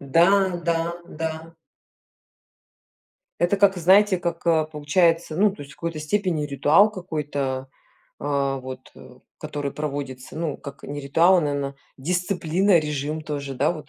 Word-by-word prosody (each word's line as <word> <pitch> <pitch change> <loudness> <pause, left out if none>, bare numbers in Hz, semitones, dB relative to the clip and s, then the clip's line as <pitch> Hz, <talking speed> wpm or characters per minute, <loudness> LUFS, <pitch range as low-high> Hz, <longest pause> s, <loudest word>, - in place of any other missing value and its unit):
Да, 155 +5 +4 0.4
да, 170 0 0
да. 160 +1 -5 1.9
Это 175 +3 +2
как, 195 -2 +4
знаете, 190 +2 +5
как, 170 0 -4
э, 160 -2 +3
получается, 165 +2 +1
ну, 205 +4 +4
то 190 -7 -9
есть 140 - -12
в - - -18
какой-то 165 -2 -4
степени 165 0 0
ритуал 150 +8 +4
какой-то, 145 -8 -3 0.5
а, 140 -1 -1
вот, 130 0 -9
э, 125 0 -15 0.2
который 145 -2 -4
проводится, 140 -3 -5
ну, 160 -3 -3
как 140 -1 -10
не 145 +1 -6
ритуал, 165 +7 +4
а, - - +3
наверно, 140 -2 -2 0.2
дисциплина, 180 +3 +1
режим 150 0 -3
тоже, 145 -3 -5
да 140 +6 +1
вот. 155 -4 -10
155 Hz, 145 wpm, -24 LUFS, 140-170 Hz, 1.9 s, знаете